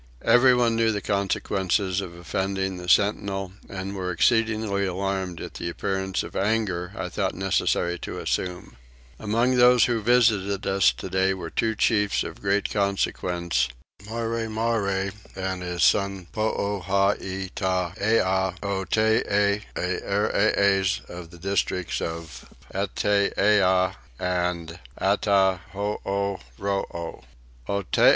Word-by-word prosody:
Everyone 120 Hz, -2 st, +5 dB
knew 115 Hz, 0 st, +3 dB
the 105 Hz, -, -1 dB
consequence 100 Hz, -2 st, 0 dB
of 95 Hz, -2 st, -3 dB
offending 95 Hz, +2 st, -2 dB
the 90 Hz, 0 st, -6 dB
sentinel 100 Hz, -1 st, +2 dB, 0.2 s
and 100 Hz, 0 st, -5 dB
were 90 Hz, -2 st, -3 dB
exceedingly 110 Hz, +2 st, +2 dB
alarmed 95 Hz, -2 st, -2 dB
at -, -, -7 dB
the 85 Hz, -, -4 dB
appearance 95 Hz, +2 st, -2 dB
of -, -, -9 dB
anger 95 Hz, -4 st, 0 dB
I 90 Hz, -, -3 dB
thought 95 Hz, +1 st, -2 dB
necessary 90 Hz, -2 st, 0 dB
to -, -, -6 dB
assume. 90 Hz, -9 st, -3 dB, 0.4 s
Among 115 Hz, +4 st, +1 dB
those 125 Hz, -1 st, +6 dB
who 115 Hz, -2 st, 0 dB
visited 105 Hz, -4 st, +2 dB
us 95 Hz, -9 st, +4 dB
today 95 Hz, +9 st, 0 dB
were 85 Hz, -3 st, -7 dB
two 110 Hz, -1 st, 0 dB
chiefs 105 Hz, -2 st, +2 dB
of -, -, -8 dB
great 100 Hz, +1 st, 0 dB
consequence, 90 Hz, -, 0 dB, 0.4 s
Marremarre 115 Hz, -3 st, -1 dB, 0.2 s
and 95 Hz, -1 st, -3 dB
his 90 Hz, -1 st, -2 dB
son 100 Hz, -2 st, +2 dB
Poohaitaiah 95 Hz, -2 st, 0 dB
Otee, 100 Hz, +1 st, +1 dB
Earees 100 Hz, +1 st, +1 dB
of 85 Hz, -1 st, -8 dB
the 85 Hz, -, -13 dB
districts 90 Hz, -1 st, -1 dB
of 80 Hz, -6 st, -6 dB, 0.2 s
Itteeah 100 Hz, -1 st, +2 dB, 0.2 s
and 90 Hz, -2 st, -2 dB, 0.2 s
Attahooroo. 100 Hz, 0 st, 0 dB
95 Hz, 100 wpm, -25 LUFS, 90-105 Hz, 0.4 s, those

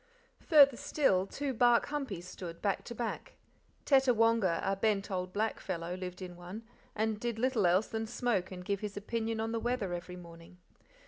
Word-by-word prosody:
Farther 280 Hz, -6 st, +6 dB
still, 195 Hz, -12 st, +1 dB
two 280 Hz, +3 st, -3 dB
bark 240 Hz, 0 st, +4 dB
humpies 260 Hz, -, -4 dB
stood, 170 Hz, -2 st, -8 dB
back 200 Hz, -2 st, -1 dB
to 235 Hz, -, -7 dB
back. 230 Hz, -1 st, -4 dB, 0.5 s
Tettawonga, 230 Hz, -, +4 dB
a 195 Hz, -, +1 dB
bent 200 Hz, 0 st, 0 dB
old 180 Hz, -1 st, -2 dB
black 215 Hz, +3 st, -1 dB
fellow, 170 Hz, -2 st, -4 dB
lived 185 Hz, 0 st, -6 dB
in 180 Hz, -1 st, -8 dB
one, 180 Hz, +6 st, -8 dB, 0.3 s
and 220 Hz, 0 st, 0 dB
did 235 Hz, -1 st, -2 dB
little 235 Hz, -5 st, +2 dB
else 185 Hz, +5 st, +3 dB
than 225 Hz, 0 st, -4 dB
smoke 215 Hz, -6 st, -1 dB
and 180 Hz, -1 st, -8 dB
give 200 Hz, 0 st, -1 dB
his 205 Hz, -1 st, -5 dB
opinion 225 Hz, +2 st, -2 dB
on 225 Hz, 0 st, -1 dB
the 230 Hz, -, -1 dB
weather 235 Hz, -6 st, -1 dB
every 175 Hz, +1 st, -6 dB
morning. 170 Hz, 0 st, -13 dB
210 Hz, 180 wpm, -32 LUFS, 180-230 Hz, 0.5 s, Farther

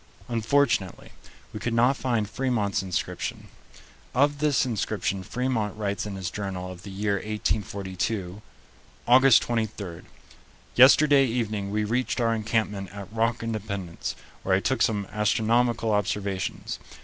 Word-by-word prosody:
Unfortunately, 115 Hz, -4 st, +1 dB, 0.4 s
we 105 Hz, -, -5 dB
could 115 Hz, +1 st, -2 dB
not 125 Hz, +4 st, +4 dB
find 120 Hz, -6 st, 0 dB
Fremont's 110 Hz, -5 st, 0 dB
inscription. 95 Hz, -2 st, -4 dB, 0.7 s
Of 145 Hz, +2 st, +3 dB
this 145 Hz, -5 st, +2 dB
inscription 105 Hz, -4 st, -2 dB
Fremont 115 Hz, 0 st, -2 dB
writes 100 Hz, -1 st, -2 dB
in 100 Hz, -, -5 dB
his 95 Hz, -2 st, -4 dB
journal 95 Hz, -3 st, -4 dB
of 90 Hz, -1 st, -10 dB
the 100 Hz, -, -9 dB
year 100 Hz, +1 st, -1 dB
1842: 100 Hz, -2 st, -3 dB, 0.7 s
"August 130 Hz, 0 st, +7 dB
23. 105 Hz, -7 st, -3 dB, 0.7 s
Yesterday 140 Hz, +1 st, +7 dB
evening 110 Hz, -4 st, -2 dB
we 105 Hz, +1 st, 0 dB
reached 125 Hz, +5 st, -1 dB
our 115 Hz, -1 st, +2 dB
encampment 110 Hz, -3 st, -1 dB
at 100 Hz, +1 st, -9 dB
Rock 115 Hz, +1 st, 0 dB
Independence, 100 Hz, -6 st, -4 dB, 0.3 s
where -, -, +2 dB
I -, -, +3 dB
took -, -, -1 dB
some 105 Hz, -3 st, +2 dB
astronomical 115 Hz, +2 st, +1 dB
observations. 100 Hz, -1 st, -2 dB
110 Hz, 125 wpm, -26 LUFS, 100-120 Hz, 0.7 s, August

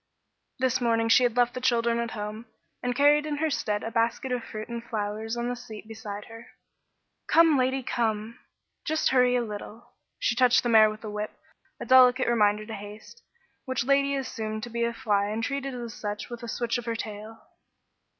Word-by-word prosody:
This 255 Hz, -1 st, +1 dB
morning 230 Hz, -1 st, +1 dB
she 240 Hz, -, +6 dB
had 245 Hz, -1 st, +1 dB
left 245 Hz, 0 st, +3 dB
the 255 Hz, -, -5 dB
children 235 Hz, -2 st, +2 dB
at 235 Hz, 0 st, -2 dB
home, 210 Hz, +2 st, -6 dB, 0.3 s
and 245 Hz, 0 st, -2 dB
carried 295 Hz, +2 st, +4 dB
in 300 Hz, -, -2 dB
their 315 Hz, +1 st, 0 dB
stead 210 Hz, -8 st, -1 dB
a 225 Hz, -, -4 dB
basket 230 Hz, +3 st, 0 dB
of 250 Hz, -2 st, -1 dB
fruit 215 Hz, 0 st, -7 dB
and 235 Hz, -1 st, -6 dB
flowers 220 Hz, +1 st, -3 dB
on 240 Hz, 0 st, -2 dB
the 245 Hz, -, -2 dB
seat 225 Hz, -3 st, -10 dB
beside 210 Hz, -2 st, -7 dB
her. 225 Hz, +1 st, -12 dB, 0.8 s
"Come, 330 Hz, -2 st, +5 dB
Lady, 260 Hz, 0 st, +1 dB
come; 225 Hz, -2 st, -2 dB, 0.4 s
just 315 Hz, 0 st, +1 dB
hurry 250 Hz, -1 st, +4 dB
a 245 Hz, -, +1 dB
little." 220 Hz, +2 st, -8 dB, 0.3 s
She -, -, +1 dB
touched 250 Hz, 0 st, +4 dB
the 240 Hz, -, 0 dB
mare 220 Hz, -1 st, +7 dB
with 215 Hz, 0 st, -8 dB
the 215 Hz, -, -6 dB
whip, 210 Hz, 0 st, -5 dB, 0.4 s
a -, -, -5 dB
delicate 255 Hz, +1 st, +6 dB
reminder 215 Hz, -2 st, +2 dB
to 220 Hz, -, -7 dB
haste, 210 Hz, -, -10 dB, 0.4 s
which 260 Hz, -3 st, -1 dB
Lady 280 Hz, +1 st, +3 dB
assumed 220 Hz, -5 st, -4 dB
to 240 Hz, -, -6 dB
be 235 Hz, 0 st, -1 dB
a 235 Hz, -, -1 dB
fly 205 Hz, -3 st, 0 dB
and 215 Hz, +2 st, -3 dB
treated 275 Hz, 0 st, -3 dB
as 235 Hz, -2 st, -6 dB
such 210 Hz, 0 st, -5 dB
with 240 Hz, 0 st, -7 dB
a 235 Hz, -, -7 dB
switch 235 Hz, +1 st, -1 dB
of 240 Hz, -, -9 dB
her 230 Hz, -1 st, -2 dB
tail. 215 Hz, 0 st, -7 dB
235 Hz, 200 wpm, -27 LUFS, 215-250 Hz, 0.8 s, mare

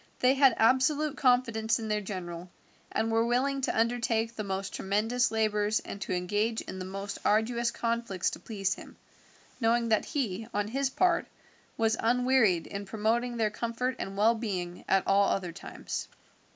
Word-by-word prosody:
They 255 Hz, +1 st, +4 dB
had 270 Hz, -3 st, +5 dB
absolute 270 Hz, +6 st, +3 dB
confidence 230 Hz, -4 st, +2 dB
in 225 Hz, -, -5 dB
their 210 Hz, -1 st, 0 dB
general, 180 Hz, -3 st, -6 dB, 0.4 s
and 225 Hz, +1 st, 0 dB
were 225 Hz, 0 st, +3 dB
willing 265 Hz, +4 st, +1 dB
to 255 Hz, -, 0 dB
undertake 230 Hz, -1 st, +1 dB
the 215 Hz, -, -3 dB
most 195 Hz, 0 st, -3 dB
tremendous 225 Hz, +6 st, +1 dB
labours 215 Hz, -1 st, +1 dB
and 200 Hz, -, -8 dB
to 195 Hz, -, -4 dB
engage 205 Hz, +5 st, 0 dB
in 190 Hz, -, -7 dB
the 185 Hz, -, -5 dB
most 195 Hz, +1 st, -5 dB
arduous 235 Hz, +3 st, +2 dB
conflicts 230 Hz, -6 st, -1 dB
to -, -, -7 dB
please 195 Hz, -3 st, -2 dB
him, -, -, -12 dB, 0.6 s
knowing 230 Hz, 0 st, +2 dB
that 220 Hz, -, +2 dB
he, 225 Hz, -6 st, -2 dB
on 205 Hz, 0 st, 0 dB
his 270 Hz, +3 st, 0 dB
part, 350 Hz, +4 st, +2 dB, 0.5 s
was 225 Hz, -1 st, +2 dB
unwearied 240 Hz, -7 st, +3 dB
in 200 Hz, 0 st, -6 dB
promoting 230 Hz, +4 st, 0 dB
their 220 Hz, -2 st, +1 dB
comfort 235 Hz, +3 st, -2 dB
and 195 Hz, 0 st, -5 dB
well 220 Hz, +3 st, +5 dB
being 185 Hz, -6 st, -4 dB
at 195 Hz, -, +3 dB
all 200 Hz, 0 st, +4 dB
other 180 Hz, -3 st, -1 dB
times. 175 Hz, -, -6 dB
225 Hz, 165 wpm, -29 LUFS, 200-240 Hz, 0.6 s, had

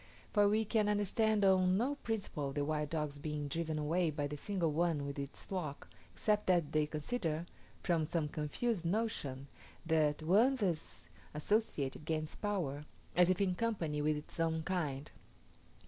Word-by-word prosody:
For 205 Hz, -1 st, +5 dB
we 220 Hz, +1 st, +2 dB
can 215 Hz, -1 st, +2 dB
understand 210 Hz, +1 st, +2 dB
on 185 Hz, -1 st, +5 dB
no 255 Hz, +6 st, +1 dB
principle 200 Hz, -, -3 dB
the 145 Hz, 0 st, 0 dB
wild 150 Hz, -1 st, -1 dB
dogs 150 Hz, -2 st, -2 dB
being 150 Hz, 0 st, -3 dB
driven 160 Hz, +1 st, -2 dB
away 165 Hz, +3 st, +1 dB
by 145 Hz, -1 st, -2 dB
the 145 Hz, +1 st, -3 dB
single 175 Hz, +1 st, -1 dB
one 160 Hz, -2 st, +1 dB
with 140 Hz, 0 st, -4 dB
its 140 Hz, 0 st, -5 dB
flock, 160 Hz, -7 st, -4 dB, 0.2 s
except 210 Hz, -1 st, +1 dB
that 170 Hz, -5 st, +3 dB
they 155 Hz, -1 st, +2 dB
consider, 160 Hz, 0 st, -2 dB, 0.4 s
from 170 Hz, -3 st, +2 dB
some 160 Hz, -1 st, 0 dB
confused 165 Hz, +8 st, -1 dB
notion, 165 Hz, -, -1 dB, 0.4 s
that 155 Hz, -2 st, +3 dB
the 155 Hz, -, -9 dB
one 220 Hz, +11 st, +5 dB
thus 185 Hz, -10 st, -2 dB, 0.3 s
associated 150 Hz, -5 st, 0 dB
gains 155 Hz, -1 st, -1 dB
power, 160 Hz, -9 st, -2 dB, 0.3 s
as 180 Hz, 0 st, +6 dB
if 185 Hz, -, +2 dB
in 195 Hz, -2 st, +2 dB
company 175 Hz, -8 st, -1 dB
with 150 Hz, 0 st, +2 dB
its 150 Hz, -, -7 dB
own 160 Hz, -1 st, +1 dB
kind. 155 Hz, -6 st, -2 dB
165 Hz, 165 wpm, -35 LUFS, 150-200 Hz, 0.4 s, as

